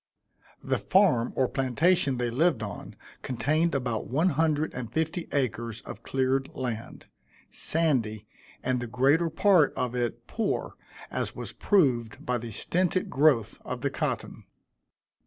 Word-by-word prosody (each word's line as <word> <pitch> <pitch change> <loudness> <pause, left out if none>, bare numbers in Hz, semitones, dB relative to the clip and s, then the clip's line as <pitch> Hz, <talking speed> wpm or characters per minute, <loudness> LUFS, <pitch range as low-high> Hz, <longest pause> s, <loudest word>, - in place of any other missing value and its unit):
The - - 0
farm, 175 - +3
or 130 - +2
plantation, 140 +2 +1
they 120 -1 -1
lived 135 -2 +2
on, 100 - -7 0.3
contained 155 +6 0
about 120 -5 -2
one 155 - +2
hundred 155 0 +1
and 120 -3 -6
fifty 160 +2 -2
acres 115 -4 -2
of - - -9
cleared 135 0 0
land, 120 -4 -5 0.5
sandy, 120 -10 +1 0.4
and 130 0 0
the 120 - -4
greater 140 +8 +3
part 170 -1 +4
of 125 -1 -2
it 120 -1 -2
poor, - - -2 0.4
as - - -3
was - - -6
proved 125 - +1
by 125 -1 0
the 115 +1 -7
stinted 180 - 0
growth 135 -5 +3
of - - -5
the - - -1
cotton. - - -3
135 Hz, 140 wpm, -27 LUFS, 120-160 Hz, 0.5 s, part